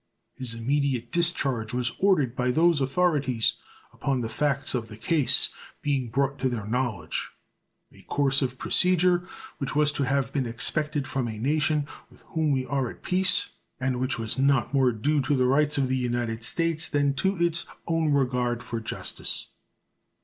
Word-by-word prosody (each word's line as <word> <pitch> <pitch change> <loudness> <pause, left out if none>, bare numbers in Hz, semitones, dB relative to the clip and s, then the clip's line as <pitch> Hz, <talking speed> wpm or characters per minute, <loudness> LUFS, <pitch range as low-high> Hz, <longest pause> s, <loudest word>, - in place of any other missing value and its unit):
His 125 -3 -3
immediate 125 0 -1
discharge 135 -10 +1
was 125 0 0
ordered 150 -11 +3
by 125 0 0
those 160 +2 +3
authorities 135 -5 +2 0.4
upon 135 -2 -1
the 115 - -3
facts 140 +2 0
of 120 -3 -2
the 105 -1 -10
case 150 +3 +3 0.3
being 135 -4 0
brought 140 +3 0
to 130 - +1
their 115 -5 -4
knowledge 115 -4 -2 0.6
a - - -15
course 140 -1 +1
of 130 -1 -2
procedure 180 +2 +2 0.3
which 140 +1 -3
was 150 0 +4
to 145 -1 -1
have 135 -1 0
been 135 -4 0
expected 145 +5 -1
from 130 -3 -2
a 110 -2 -5
nation 150 +4 +1 0.2
with - - -19
whom 160 -2 0
we 130 -2 0
are 135 -3 -1
at - - -12
peace, 185 +1 +1 0.3
and 130 -1 -1
which 130 0 +1
was 115 +2 -3
not 135 -2 +2
more 135 -2 +4
due 140 +7 +1
to 135 +2 +1
the 130 -1 +2
rights 145 +3 +2
of 135 -2 +2
the 130 0 0
United 120 -2 -2
States 165 +5 0
than 145 -1 +1
to 190 +8 0
its 170 0 0 0.2
own 165 -2 +1
regard 125 -3 +1
for 115 - -4
justice. 110 - -4
135 Hz, 170 wpm, -26 LUFS, 125-150 Hz, 0.6 s, was